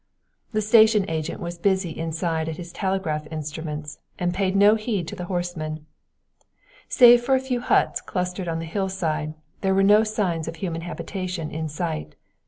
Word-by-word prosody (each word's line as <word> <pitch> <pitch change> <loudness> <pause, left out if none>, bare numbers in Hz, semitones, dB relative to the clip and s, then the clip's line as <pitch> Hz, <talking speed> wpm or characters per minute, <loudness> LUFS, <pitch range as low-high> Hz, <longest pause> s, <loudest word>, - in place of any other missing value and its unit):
The 215 -2 0
station 215 -2 +5
agent 160 -1 -3
was 170 0 -6
busy 190 -2 +1
inside 160 0 -2
at 160 - -5
his 175 -1 -8
telegraph 190 -6 -2
instruments 150 -1 -5 0.2
and 175 0 -1
paid 190 0 0
no 205 +2 +6
heed 215 -6 -2
to - - -6
the 180 - -5
horsemen. 175 -4 -4 1.0
Save 245 -1 +8
for 265 +2 +3
a - - +3
few 260 -2 -2
huts - - +2
clustered 180 0 -3
on 165 -1 -1
the 165 - -4
hillside, 165 -4 -2 0.3
there 190 -1 +2
were 195 - +4
no 210 +2 +6
signs 190 -7 -1
of 165 - -5
human 170 -3 -4
habitation 180 -1 -5
in 160 0 -3
sight. 145 - -4
175 Hz, 170 wpm, -24 LUFS, 160-200 Hz, 1.0 s, Save